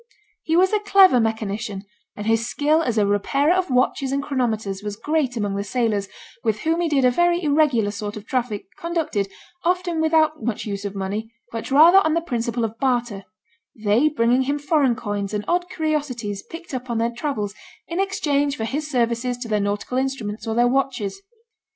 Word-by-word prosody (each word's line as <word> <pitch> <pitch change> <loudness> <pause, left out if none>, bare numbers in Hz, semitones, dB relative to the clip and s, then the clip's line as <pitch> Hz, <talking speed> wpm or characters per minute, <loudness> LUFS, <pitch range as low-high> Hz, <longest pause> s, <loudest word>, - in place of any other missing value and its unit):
He 325 - 0
was 375 +3 +4
a 425 - +3
clever 390 -9 +6
mechanician, 220 -2 -2 0.3
and 205 - -6
his 225 +2 +1
skill 300 +5 +2
as 240 -7 -1
a 210 - +4
repairer 275 - +2
of 370 -2 0
watches 260 +1 +1
and 280 +1 -1
chronometers 220 -8 -2
was 205 -1 -4
great 285 0 -1
among 205 -2 -1
the 200 - -2
sailors, 210 -2 0 0.4
with 215 -2 0
whom 330 +2 +1
he 340 - 0
did 275 -4 +3
a 250 - +5
very 345 +5 +2
irregular 285 -8 +2
sort 205 0 -5
of 210 - -9
traffic, 240 -4 -2
conducted, 330 - -1 0.4
often 350 -2 0
without 315 -2 +2
much 225 -1 -2
use 200 -1 -4
of 200 0 -4
money, 205 +3 -4 0.2
but 230 -1 -5
rather 325 +7 +8
on 315 -5 +1
the 335 - +1
principle 235 -5 -2
of 225 +1 -7
barter, 240 -7 0 0.5
they 220 +7 +2
bringing 245 -3 +2
him 280 +2 0
foreign 285 -4 +2
coins 205 -3 -3
and 210 - -3
odd 355 +1 0
curiosities 285 - -2
picked 335 -2 -10
up 255 -1 -5
on 235 - -1
their 230 +1 +1
travels 235 -5 -3 0.3
in 340 +2 -3
exchange 290 -7 0
for 220 - -2
his 295 +6 -3
services 240 -1 0
to 245 -1 -6
their 210 -1 +1
nautical 205 +5 -1
instruments 230 -5 -3
or 225 - -1
their 240 +1 +4
watches. 260 - -1
245 Hz, 190 wpm, -22 LUFS, 215-305 Hz, 0.5 s, rather